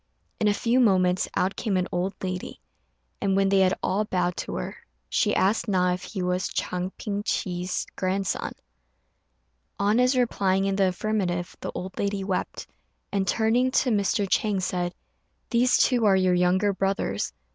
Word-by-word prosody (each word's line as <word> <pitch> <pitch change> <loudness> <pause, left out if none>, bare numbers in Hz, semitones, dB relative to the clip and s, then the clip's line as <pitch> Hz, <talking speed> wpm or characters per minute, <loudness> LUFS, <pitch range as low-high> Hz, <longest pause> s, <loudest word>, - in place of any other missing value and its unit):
In 215 - +2
a 205 - +4
few 235 +4 +2
moments 185 -6 +3
out 190 +2 +1
came 200 -4 -1
an 180 0 0
old 185 +2 -1
lady, 185 -1 -4 0.6
and 195 -2 +1
when 195 0 +3
they 195 0 +4
had 185 -1 +4
all 200 +3 +1
bowed 180 -4 -1
to - - -4
her, - - -4 0.3
she - - +1
asked 200 +5 +2
Na 180 -3 +2
if 180 - -4
he 185 0 -4
was 180 +1 0
Chang 180 0 -2
Ping 205 -2 -3
chih's 180 -3 -2
grandson. 190 +1 -1 1.2
On 205 +4 +2
his 250 +1 +3
replying 195 -6 +1
in 195 0 0
the 195 -1 +3
affirmative, 180 -2 -2
the - - -5
old 185 +1 -5
lady 200 -1 -1
wept, 190 -1 -3 0.5
and, 195 -1 0
turning 230 +5 +2
to 255 0 +2
Mr. 200 -1 +1
Chang, 205 0 +1
said, 180 -1 -2 0.6
"These 245 +1 +4
two 245 -3 +3
are 200 -2 +5
your 185 -1 +3
younger 180 +3 +2
brothers." 195 - -1
195 Hz, 170 wpm, -26 LUFS, 180-210 Hz, 1.2 s, are